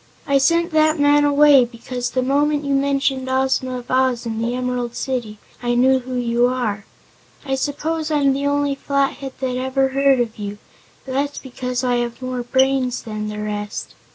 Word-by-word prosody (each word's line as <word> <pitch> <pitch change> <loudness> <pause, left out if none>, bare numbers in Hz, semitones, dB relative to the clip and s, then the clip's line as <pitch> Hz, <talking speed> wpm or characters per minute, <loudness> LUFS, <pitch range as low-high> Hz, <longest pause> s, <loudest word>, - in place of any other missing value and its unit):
I 280 -3 +3
sent 335 +5 +2
that 310 0 +3
man 290 0 +4
away 290 -2 +6
because 245 +1 -5
the 255 - -1
moment 290 +2 +1
you 280 - 0
mentioned 275 -1 0
Ozma 260 -1 0
of 245 0 -9
Oz, 255 -2 +1
and 225 0 -3
the 240 +1 -1
Emerald 250 -1 -2
City, 240 -5 -3 0.2
I 240 0 0
knew 260 +2 +4
who 255 0 -6
you 240 0 +2
are. 225 -5 -2 0.6
I 270 - -2
suppose 305 +4 -2
I'm 285 -3 +2
the 280 +1 -1
only 285 0 +1
Flathead 275 -1 -1
that 255 -1 -1
ever 265 +1 +1
heard 275 0 +3
of 230 -2 -2
you, 205 0 -5 0.5
but 260 - -6
that's 280 +2 -1
because 250 -1 -4
I 245 -1 +1
have 240 -1 -3
more 255 -1 -3
brains 260 0 +1
than 215 -1 -5
the 210 0 -5
rest." 210 0 -5
260 Hz, 180 wpm, -20 LUFS, 245-280 Hz, 0.6 s, away